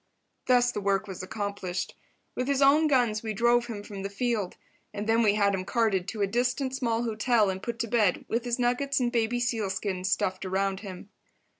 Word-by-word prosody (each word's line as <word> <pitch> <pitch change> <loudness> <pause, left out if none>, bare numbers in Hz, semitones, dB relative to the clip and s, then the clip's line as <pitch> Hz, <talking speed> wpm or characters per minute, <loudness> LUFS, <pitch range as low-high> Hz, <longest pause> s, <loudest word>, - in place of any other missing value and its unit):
Thus 245 -1 +4
the 210 - -4
work 200 +1 0
was 190 -2 -6
accomplished. 195 -2 -4 0.4
With 250 - -2
his 280 -1 +1
own 285 +3 +5
guns 240 -7 +2
we 220 -2 -4
drove 240 +2 +3
him 210 -4 -6
from 200 -2 -8
the 195 - -3
field. 210 -2 -2 0.4
And 205 +1 -4
then 225 +1 +3
we 210 -2 +3
had 200 -1 +3
him 190 -1 -1
carted 205 -4 0
to 215 -2 -2
a - - +4
distant 250 +5 -1
small 235 -3 0
hotel 220 -2 +2
and 190 0 -6
put 235 +2 -4
to 230 - -2
bed 215 -5 +1
with 230 +1 -1
his 240 0 -1
nuggets 265 +3 +1
and 245 -1 0
baby 235 0 0
seal 230 -4 -1
skins 190 0 -2
stuffed 185 +1 0
around 190 0 -1
him. 195 -1 -9
220 Hz, 205 wpm, -28 LUFS, 195-245 Hz, 0.4 s, own